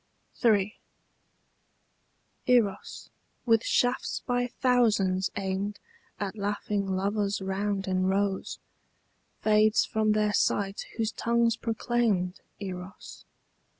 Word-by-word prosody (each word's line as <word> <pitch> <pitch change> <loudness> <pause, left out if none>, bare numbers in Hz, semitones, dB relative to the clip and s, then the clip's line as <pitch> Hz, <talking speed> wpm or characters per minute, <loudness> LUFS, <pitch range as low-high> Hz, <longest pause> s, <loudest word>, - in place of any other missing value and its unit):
III. 210 -2 +3 1.7
Eros, 230 -6 +1 0.3
with 225 -2 +4
shafts 245 +1 0
by 245 -1 0
thousands 215 -8 +2
aimed 200 +1 -2 0.4
At 200 0 -3
laughing 205 -1 -2
lovers 200 +1 0
round 195 +1 -2
in 185 0 +1
rows, 195 0 0 0.9
Fades 215 0 +4
from 215 -2 +1
their 210 -1 +1
sight 195 -1 0
whose 225 -1 0
tongues 235 -1 +1
proclaimed 225 -5 0 0.2
Eros. 185 -2 -8
205 Hz, 90 wpm, -28 LUFS, 195-225 Hz, 1.7 s, with